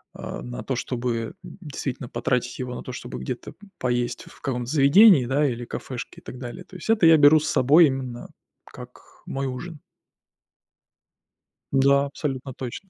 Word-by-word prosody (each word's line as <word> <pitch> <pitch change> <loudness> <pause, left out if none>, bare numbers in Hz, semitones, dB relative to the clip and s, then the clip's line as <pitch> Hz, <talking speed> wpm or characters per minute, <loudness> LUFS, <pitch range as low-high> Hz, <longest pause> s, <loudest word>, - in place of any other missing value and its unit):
а, - - -7
на - - -7
то, - - -2
чтобы 120 -1 -3
действительно 145 -8 -6
потратить 125 0 -2
его 125 -1 -4
на - - -7
то, - - -7
чтобы 60 0 -7
где-то 65 - -6 0.2
поесть 120 -1 -1
в - - -16
каком-то 125 -2 -3
заведении, 155 - +6
да, 140 +4 +1
или 120 -2 -4
кафешке 120 0 -7
и - - -38
так 125 - -9
далее. 120 -2 -7
То 185 - -12
есть 180 - -9
это 225 -5 +4
я 165 -1 +8
беру 150 +1 +7
с 155 - -2
собой 150 +6 +6
именно 130 -3 -5 0.4
как - - -12 0.2
мой 135 0 -3
ужин. 150 +5 -6 1.9
Да, 140 +1 +4
абсолютно 135 -2 -5
точно. 130 +11 -7
135 Hz, 165 wpm, -24 LUFS, 125-150 Hz, 1.9 s, я